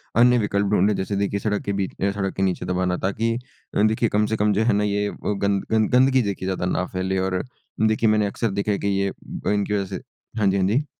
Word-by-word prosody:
अन्य 125 +1 +6
विकल्प 100 -1 0
ढूँढे 105 +1 +3
जैसे 95 +1 -2
देखिए 100 0 -1
सड़क 105 0 -1
के 100 - -1
बीच 95 -2 -4
अ, 100 0 +2
सड़क 95 -1 -2
के 95 - 0
नीचे 90 -1 -1
दबाना। 90 0 0
ताकि 110 +4 -1 0.4
अ, - - +3
देखिए 110 +1 +2
कम 105 +1 +2
से 110 +1 -1
कम 105 0 +2
जो 110 +3 +2
है 115 -2 +3
ना 105 +1 +1
ये 105 0 0
अ, - - -3
गंद 100 -1 0
गंद 110 -1 +3
गंदगी 130 +1 +4
देखिए 100 -3 -3
ज़्यादा 95 -1 -2
ना 90 0 0
फ़ैले 95 +1 -1
और 95 -1 -1 0.4
देखिए 110 0 +2
मैंने 105 -1 +3
अक्सर 110 +1 -2
देखा 100 +2 -1
है 100 - +1
कि 100 - -2
ये 100 0 +1
अ, - - -6
इनकी 105 0 0
वजह 100 -1 0
से 95 -1 -6 0.4
हाँ 105 - +3
जी, 95 +1 +2
हाँ 95 0 +2
जी। 130 +9 +1
100 Hz, 255 wpm, -23 LUFS, 95-105 Hz, 0.4 s, अन्य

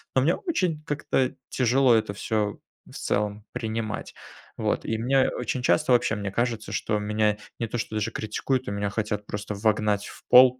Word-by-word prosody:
но 130 - +5
мне 165 +6 +3
очень 180 - -1
как-то 140 -4 0 0.2
тяжело 125 0 +4
это 110 -2 +1
всё 105 0 -1 0.3
в - - -16
целом 105 +1 -1
принимать. 110 -1 -3 0.4
Вот, - - 0
и 110 - -1
мне 130 +4 +3
очень 130 - -2
часто 140 +3 +3
вообще 120 - +4
мне 100 -1 -3
кажется, 115 0 -1
что 105 - 0
меня 105 0 +1 0.2
не 115 - -1
то 120 - -3
что 110 -1 -3
даже 105 +1 0
критикуют, 130 +4 -1
но 100 - -3
меня 100 0 -1
хотят 105 -1 -2
просто 105 0 -4
вогнать 105 0 +1
в - - -12
пол, 125 0 +8
110 Hz, 180 wpm, -26 LUFS, 105-130 Hz, 0.4 s, пол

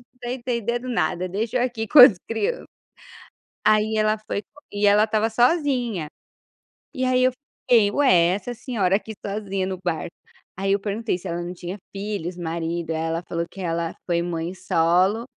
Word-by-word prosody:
estou 245 -1 -6
entendendo 240 -1 -2
nada, 185 -6 -1
deixa 220 +6 -2
eu - - +1
aqui 235 -3 -3
com 300 - +6
as 245 -7 +10
crianças". 440 - -2 1.0
Aí 215 +1 +3
ela 215 0 +2
foi 205 - -2 0.3
e 205 0 +1
ela 205 +1 +5
estava 220 0 +1
sozinha, 245 - +1 0.9
e 260 - -3
aí 255 0 +3
eu 255 - +4 0.4
fiquei: 230 -5 +5
"Ué 185 -11 +4
essa 225 +5 -5
senhora 220 -6 0
aqui 220 +1 -9
sozinha 200 -2 -2
no 185 -1 -4
barco". 170 -1 -3 0.4
Aí 195 +1 0
eu 200 - +1
perguntei 210 0 -2
se 185 - -9
ela 170 0 -3
não 175 +1 -5
tinha 180 +2 -7
filhos, 195 -3 -4
marido. 165 0 -3
Aí 160 - -1
ela 165 +1 -2
falou 170 0 -2
que 195 - -13
ela 170 -2 -2
foi 170 -1 0
mãe 170 0 -3
solo, 185 +4 +2
205 Hz, 170 wpm, -23 LUFS, 175-235 Hz, 1.0 s, as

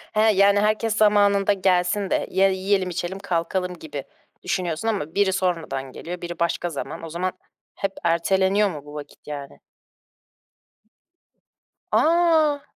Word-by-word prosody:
He, 215 - +4
yani, 200 +1 +5
herkes 215 +1 +1
zamanında 205 -1 +4
gelsin 185 +1 +1
de - - 0
ye 190 +1 +3
yiyelim, 190 0 0
içelim, 175 +2 -4
kalkalım 180 0 -2
gibi 145 -3 -6 0.4
düşünüyorsun 175 +2 -2
ama 195 -9 -2
biri 200 -2 +3
sormadan 165 -8 -2
geliyor, 175 +6 -7
biri 175 -1 -6
başka 170 +1 0
zaman. 160 +1 -6
O 165 - -6
zaman 180 +3 -2 0.4
hep 195 - -2
erteleniyor 190 +4 +2
mu 150 -5 -8
bu 145 - -11
vakit 145 -1 -10
yani? 140 -2 -7 2.3
A! 320 -3 +3
185 Hz, 130 wpm, -23 LUFS, 170-200 Hz, 2.3 s, yani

